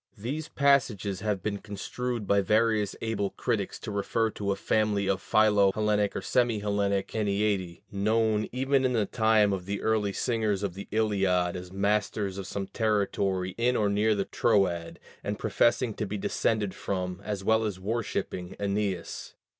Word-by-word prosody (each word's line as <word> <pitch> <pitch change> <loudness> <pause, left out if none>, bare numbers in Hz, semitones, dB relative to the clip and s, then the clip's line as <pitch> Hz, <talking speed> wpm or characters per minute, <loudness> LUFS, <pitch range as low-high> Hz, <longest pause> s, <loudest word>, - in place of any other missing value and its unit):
These 140 +9 -4
passages 115 -9 +2
have 100 -3 -2
been 100 -1 -2
construed 115 +3 -4
by 100 +1 +3
various 105 0 +2
able 110 -3 -1
critics - - -2
to - - -5
refer 110 +2 0
to 100 -1 -2
a - - +1
family 105 -2 +1
of 95 -1 0
philo 105 -2 +4
Hellenic 105 -1 +1
or - - -3
semi 120 -3 +2
Hellenic 100 -1 0
Æneadæ, 100 -4 -1
known 110 +1 +1
even 135 +2 +1
in 130 -1 +2
the 110 -3 +2
time 110 -3 +3
of 90 -1 -4
the 100 0 -2
early 110 -2 +1
singers 110 -3 0
of 100 -3 -2
the 100 +2 -8
Iliad 95 -5 +1
as 90 0 -7
masters 100 0 0
of 95 - -6
some 100 0 -3
territory 100 -4 0
in 125 +2 +2
or 105 -3 +2
near 105 +2 +2
the 100 -1 -1
Troad, 90 -7 +1 0.2
and - - -2
professing 120 -1 +2
to 105 - -3
be 105 - -3
descended 105 0 0
from, 90 -1 -3
as 105 -2 -4
well 110 +2 +3
as 105 -4 -3
worshipping, 100 -3 -3
Æneas. 100 -3 -2
105 Hz, 165 wpm, -28 LUFS, 100-110 Hz, 0.2 s, philo